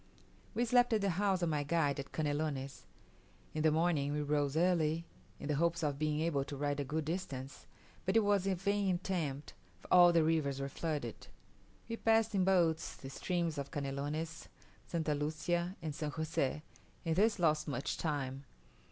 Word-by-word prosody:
We 240 - +2
slept 245 0 +4
at 215 - +2
the 200 -1 +2
house 190 0 +1
of 170 - +2
my 150 -2 0
guide 145 -1 +1
at 135 - -6
Canelones. 145 -3 -2 0.7
In 155 - -1
the 155 - +5
morning 155 -3 +1
we 150 0 -1
rose 145 0 0
early, 165 -2 +2 0.3
in - - -6
the 150 - +1
hopes 170 +3 +1
of 145 -2 -1
being 155 0 0
able 155 -4 +1
to 140 - -6
ride 145 0 -1
a - - 0
good 150 +3 -2
distance; 140 -6 -5 0.4
but 190 +3 0
it - - +6
was 200 -2 +2
a 195 - +2
vain 195 0 +1
attempt, 165 -6 -3 0.3
for - - -15
all 175 -1 +9
the 165 -2 +4
rivers 155 -4 +1
were 135 0 -3
flooded. 145 -5 -4 0.6
We 230 0 -4
passed 225 -1 +3
in 190 -2 +3
boats 170 -4 +2
the 135 - -9
streams 170 0 -1
of 140 0 -4
Canelones, 145 +3 -4 0.4
St. 165 -2 -2
Lucia, 160 +4 -1
and 155 -2 -3
San 150 +1 -3
Jose, 155 -1 -1 0.4
and 165 -1 +1
thus 210 +4 +3
lost 155 -3 +2
much 140 -2 -2
time. 140 -3 -2
160 Hz, 180 wpm, -34 LUFS, 145-175 Hz, 0.7 s, all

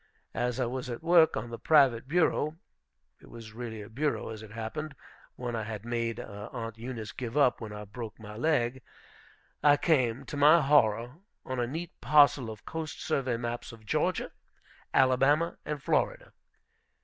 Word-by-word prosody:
As 125 +1 -1
I 130 - +2
was 125 +1 -4
at 120 +5 -6
work 170 -1 +5
on 120 - -5
the 115 - -6
private 135 -7 +4
bureau, 160 -1 +1 0.6
it - - -17
was 115 -2 -11
really 110 -2 -6
a - - -10
bureau, 140 +5 -2
as 110 -1 -7
it 110 - -10
happened, 115 +8 -5 0.4
one 120 -1 -4
I 115 - -2
had 110 0 -6
made 115 -1 -2
Aunt 115 +2 -7
Eunice 115 -2 -6
give 125 +1 -5
up 130 -5 +3
when 110 -2 -6
I 105 0 -7
broke 115 +1 -8
my 105 -1 -9
leg, 130 -1 0 0.8
I 145 -1 +6
came, 130 -6 +1
to - - -7
my 150 +4 +7
horror, 125 -3 +3 0.3
on 130 -1 -3
a 120 - 0
neat 165 +6 -5
parcel 145 -5 +5
of 110 -1 -10
coast 160 -2 -5
survey 130 -6 -1
maps 120 0 -4
of 115 -2 -14
Georgia, - - 0 0.6
Alabama, 135 +5 +3
and 150 -2 -4
Florida. - - 0
125 Hz, 170 wpm, -29 LUFS, 115-145 Hz, 0.8 s, my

